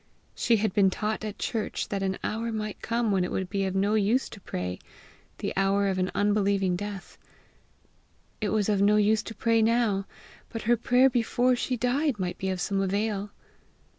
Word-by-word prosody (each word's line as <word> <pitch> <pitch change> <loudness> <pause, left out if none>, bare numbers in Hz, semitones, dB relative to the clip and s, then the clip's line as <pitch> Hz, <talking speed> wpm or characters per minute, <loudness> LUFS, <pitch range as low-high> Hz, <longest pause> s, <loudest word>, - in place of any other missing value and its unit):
She 235 - +2
had 215 -2 0
been 195 -2 +4
taught 215 +3 -3
at 215 -1 -5
church 225 -3 -3
that 200 -1 -2
an 190 -1 -1
hour 230 +2 -2
might 215 -1 -4
come 230 -1 0
when 190 -2 +2
it 180 - -3
would 190 -1 -3
be 195 -1 0
of 190 0 -2
no 200 +2 +2
use 220 +5 +2
to 205 - -11
pray 90 - -4 0.6
the - - -3
hour 195 +1 +2
of 190 -1 0
an 185 0 0
unbelieving 200 -2 +2
death: 200 +1 -7 1.2
it 210 - 0
was 210 -1 +1
of 205 -2 +2
no 205 +1 +5
use 210 +1 +3
to 225 - -9
pray 230 +1 +2
now, 220 -3 +2 0.4
but 225 - -6
her 240 +2 +4
prayer 245 +3 +4
before 245 0 +2
she 250 +1 -2
died 255 +2 +1
might 180 -2 -3
be 190 - -2
of 185 -1 -2
some 195 +2 0
avail! 200 +1 -1
210 Hz, 195 wpm, -27 LUFS, 195-225 Hz, 1.2 s, no